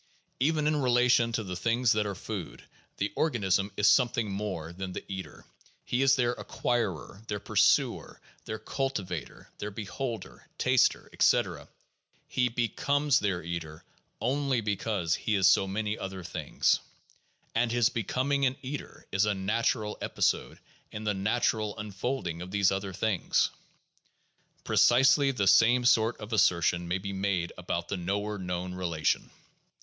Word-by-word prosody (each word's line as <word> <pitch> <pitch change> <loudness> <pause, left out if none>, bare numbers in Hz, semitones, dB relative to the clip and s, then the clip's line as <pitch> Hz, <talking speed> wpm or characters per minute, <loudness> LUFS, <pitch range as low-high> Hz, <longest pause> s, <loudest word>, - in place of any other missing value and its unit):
Even 150 +3 +1
in 150 0 +2
relation 125 -2 +3
to 115 -1 -1
the 90 -2 -5
things 115 +5 +1
that 105 -1 +1
are 100 - -4
food, - - -6 0.3
the 100 - -2
organism 100 - +1
is 105 - +3
something 115 -1 +3
more 95 -5 -4
than 95 +1 -6
their - - -5
eater. 95 -1 -7 0.4
He 125 - 0
is 135 0 +5
their 120 -2 +1
acquirer, 110 -8 -2
their 105 -1 -3
pursuer, - - +2 0.3
their 110 - -4
culti 135 -1 -3
vator, 90 -5 -7
their 105 - -3
beholder, 110 +2 -6
taster, - - +2
etc.; - - +2 0.6
he 125 -1 +1
becomes 140 +5 +1
their 95 -5 -1
eater 80 -2 -6 0.4
only 135 0 0
because 100 -4 -1
he 110 - 0
is 95 -2 +3
so 95 0 +5
many 105 +2 -2
other 95 -1 -6
things. 85 - 0 0.7
And 115 0 +1
his 120 -1 +3
becoming 130 +6 -1
an 130 - -2
eater 140 +2 -7
is 100 +2 +2
a 105 -1 0
natural 105 +2 -1
episode - - 0 0.3
in 105 - -6
the 105 -1 0
natural 105 +1 0
unfolding 105 -4 -3
of 90 - -7
these 100 0 +2
other 95 0 -3
things. 95 +1 +1 1.1
Precisely 135 +3 +5
the 120 -7 0
same 115 +5 +5
sort 115 -1 +3
of 105 +2 -7
assertions 85 -4 +2
may 90 - +1
be 100 +1 -5
made 95 -3 -1
about 85 -1 -3
the 100 - -3
knower 100 +3 -2
known 90 0 -4
relation. 85 -4 -1
105 Hz, 145 wpm, -29 LUFS, 95-120 Hz, 1.1 s, is